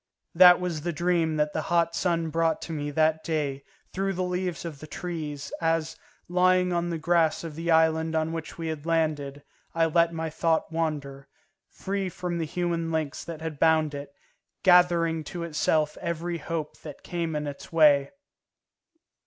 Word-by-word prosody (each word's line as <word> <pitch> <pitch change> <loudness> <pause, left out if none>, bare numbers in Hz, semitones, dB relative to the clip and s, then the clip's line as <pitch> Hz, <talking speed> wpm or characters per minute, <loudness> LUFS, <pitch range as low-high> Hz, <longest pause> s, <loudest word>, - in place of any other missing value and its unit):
That 180 +1 +8
was 175 -4 -3
the 175 +3 -2
dream 170 -1 +1
that 150 0 0
the 155 - -1
hot 170 +1 +1
sun 170 -2 0
brought 165 0 +1
to - - -7
me 145 -2 -3
that 160 +1 +1
day 145 -4 -2 0.3
through 195 +1 -1
the 185 0 -2
leaves 180 -1 -3
of 155 -4 -6
the 155 - -10
trees, 155 -4 -5
as, 165 -1 0 0.3
lying 180 0 +3
on 175 0 0
the 170 - -2
grass 165 0 +2
of 165 -2 -6
the 165 +3 -4
island 160 0 +3
on 160 0 0
which 165 -1 -6
we 165 -1 -4
had 155 0 -5
landed, 150 -4 -1 0.3
I 165 0 +3
let 170 +1 +3
my 160 -1 -4
thought 160 +1 0
wander, 145 -4 -3 0.4
free 195 -1 -3
from 175 -1 -4
the 165 - -1
human 170 0 -2
links 155 -2 -2
that 165 -2 -8
had 160 -3 -5
bound 160 -2 +3
it, 140 0 -7 0.5
gathering 175 -3 +4
to 175 0 -5
itself 155 -1 0
every 170 0 -3
hope 160 -3 -5
that 150 -3 -10
came 170 -2 -3
in 150 0 -2
its 145 -1 -8
way. 145 -4 +5
165 Hz, 175 wpm, -26 LUFS, 155-170 Hz, 0.5 s, That